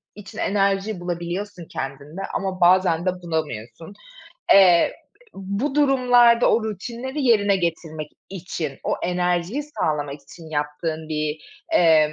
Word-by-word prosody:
için 205 -2 -11
enerji 195 0 0
bulabiliyorsun 175 +2 -5
kendinde. 140 +7 -6
Ama 190 -1 -3
bazen 175 -1 +4
de 185 - +3
bulamıyorsun. 160 - -5 0.6
Eee, 180 -4 +6 0.4
bu 200 +9 -3
durumlarda 245 -4 +5
o 230 - +2
rutinleri 235 - -5
yerine 205 -4 +4
getirmek 160 -3 -3 0.2
için, 175 -6 -5
o - - +1
enerjiyi 180 +8 0
sağlamak 150 - -2
için 160 +2 -13
yaptığın 155 +2 -3
bir, 155 0 -2 0.3
emm, 160 - +5
180 Hz, 115 wpm, -22 LUFS, 160-205 Hz, 0.6 s, Eee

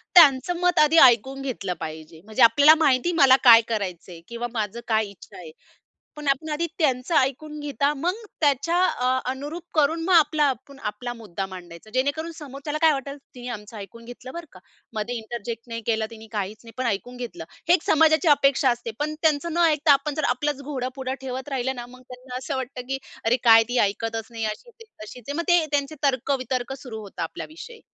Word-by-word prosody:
त्यांचं 330 +1 +6
मत 355 0 +2
आधी 305 +2 +5
ऐकून 265 +2 +4
घेतलं 225 -9 -3
पाहिजे. 160 +1 -8
म्हणजे 220 +4 -3
आपल्याला 290 +6 +7
माहिती 285 +1 +3
आहे 350 - -2
मला 260 -1 +8
काय 235 -3 +9
करायचंय 180 -6 -4
किंवा 235 +1 -4
माझं 215 0 -3
काय 220 -1 +2
इच्छा 200 - -15
आहे. 165 -3 -10 0.7
पण 300 -1 -5
आपण 275 +3 0
आधी 305 +3 -1
त्यांचं 265 -1 0
ऐकून 300 +3 0
घेता 285 0 0
मग 340 +6 -1 0.3
त्याच्या 295 +3 +2
अ, 250 0 0 0.2
अनुरूप 290 +6 -6
करून 315 +2 +2
मग 375 - +1
आपला 310 -2 +4
आपण 275 0 -3
आपला 210 +4 -4
मुद्दा 195 -5 -6
मांडायचा. 180 +1 -11
जेणेकरून 285 +6 -1
समोर 275 -3 -9
त्याला 300 0 -2
काय 320 -1 +6
वाटलं 275 0 -5 0.2
तिने 245 0 -8
आमचं 210 -1 -7
ऐकून 210 +3 -10
घेतलं 245 +2 -10
बरं 340 -1 -7
का, 185 - -15 0.3
मध्ये 220 +3 -3
इंटरजेक्ट 230 +1 -6
नाही 230 0 -5
केलं 220 -1 0
तिने, 225 -1 -12
काहीच 210 0 -3
नाही 230 - -12
पण 255 - -1
ऐकून 235 +4 -3
घेतलं. 250 +8 -7 0.2
हे 350 - +7
एक 345 - +1
समाजाची 315 +2 +4
अपेक्षा 275 -2 +4
असते. 240 -1 -3
पण 305 +1 -2
त्यांचं 320 +1 +1
न 340 - -2
ऐकता 305 -1 +4
आपण 290 +1 0
जर 310 - -2
आपलाच 280 +3 -1
घोडं 260 -3 -4
पुढं 265 -1 -4
ठेवत 260 +1 -6
राहिलं 265 -1 -2
ना 240 0 -7
मग 255 +1 -15
त्यांना 250 0 -9
असं 265 +1 -4
वाटतं, 260 0 -5
की 270 0 -2 0.3
"अरे 235 +3 +3
काय 225 -1 +8
ती 245 +1 0
ऐकतच 225 +2 -1
नाही, 225 -1 -4
अशीच 220 - -5
आहे, 455 - -17 0.2
तशीच 235 +2 -12
आहे." 285 - -3
मग 340 - -1
ते 350 -2 +5
त्यांचे 285 0 -1
तर्क-वितर्क 260 -2 -1
सुरु 225 -5 -7
होता 200 -5 -8
आपल्या 165 - -5
विषयी. 450 +9 -11
260 Hz, 205 wpm, -24 LUFS, 230-295 Hz, 0.7 s, काय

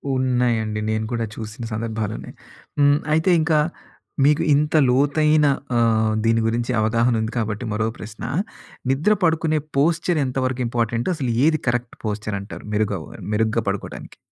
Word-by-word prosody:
ఉన్నాయండి. 120 -4 0
నేను 110 0 -1
కూడా 115 -1 -1
చూసిన 110 +3 -7
సందర్భాలున్నాయి. 110 -1 -4 0.4
హ్మ్. 145 0 +5
అయితే 160 +4 +2
ఇంకా 155 -1 +2 0.7
మీకు 150 +2 +4
ఇంత 150 +2 +1
లోతైన 150 +3 +3 0.3
ఆహ్, 110 -2 +2
దీని 115 0 +3
గురించి 120 +2 -1
అవగాహనుంది 115 0 +1
కాబట్టి 110 +1 -2
మరో 110 +1 0
ప్రశ్న. 110 +1 -9 0.7
నిద్ర 150 +11 +3
పడుకునే 160 -1 +2 0.2
పోస్చర్ 165 +3 +2
ఎంతవరకు 130 0 -1
ఇంపార్టెంట్? 115 - -1
అసలు 130 -6 -2
ఏది 155 -2 +3
కరెక్ట్ 120 -1 -1
పోస్చరంటారు? 105 -2 -4
మెరుగవ 105 0 0 0.3
మెరుగ్గా 110 +1 +1
పడుకోటానికి? 100 0 -5
120 Hz, 125 wpm, -22 LUFS, 110-145 Hz, 0.7 s, హ్మ్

